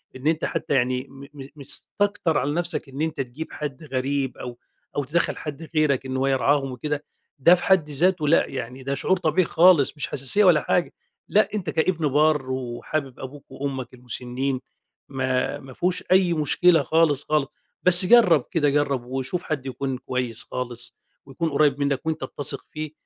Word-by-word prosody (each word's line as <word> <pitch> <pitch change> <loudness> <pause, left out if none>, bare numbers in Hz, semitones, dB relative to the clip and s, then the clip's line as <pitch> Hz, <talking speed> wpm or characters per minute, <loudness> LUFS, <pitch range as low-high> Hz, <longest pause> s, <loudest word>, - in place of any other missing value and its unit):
إن 130 +3 -4
أنت 160 0 +1
حتى 160 -2 -2
يعني 130 0 0
م 135 0 -12
م 135 -2 -9
مستكتر 160 +4 -1
على 145 +2 0
نَفسك 170 -3 -3
إن 135 +2 -6
أنت 160 -2 -1
تجيب 135 +5 -7
حد 150 -1 -6
غريب 135 -1 -2
أو 120 -1 -7 0.4
أو 145 - 0
تدخّل 155 +6 0
حد 155 +1 -7
غيرك 145 -4 +2
إن 130 0 -3
هو 135 +1 +1
يرعاهم 135 +1 +1
وكده، 145 +4 -4 0.4
ده 170 +7 +7
في 180 - -5
حد 185 -6 +3
ذاته 160 +2 +1
لأ، 165 - +4
يعني 130 -1 -6
ده 135 +1 -2
شعور 190 +7 +1
طبيعي 165 +1 +1
خالص، 165 -4 +5
مش 145 - -2
حساسية 135 +10 +2
ولا 170 -5 +5
حاجة 175 - 0 0.4
لأ، 215 - +3
أنت 195 -6 -3
كإبن 160 0 0
بار 145 -1 +2
وحابب 130 +2 -4
أبوك 135 +2 -9
وأمك 135 -3 -5
المُسنين، 125 +2 -2 0.5
ما 130 -1 -1
ما 135 -1 -12
فيهوش 180 +6 -1
أي 185 -2 +4
مشكلة 165 +3 +3
خالص، 155 -3 +2
خالص، 150 -3 0 0.4
بس 180 0 +8
جرب 180 - +5
كده، 150 -4 +2
جرب 140 -3 0
وشوف 135 +7 -3
حد 145 -4 -4
يكون 135 0 -3
كويس 125 -3 -3
خالص 120 -2 -5 0.3
ويكون 140 +5 -3
قريّب 145 -1 +2
منك 140 0 -1
وأنت 160 -3 -2
بتثق 135 +1 -4
فيه، 155 -1 -5
145 Hz, 175 wpm, -24 LUFS, 130-160 Hz, 0.5 s, بس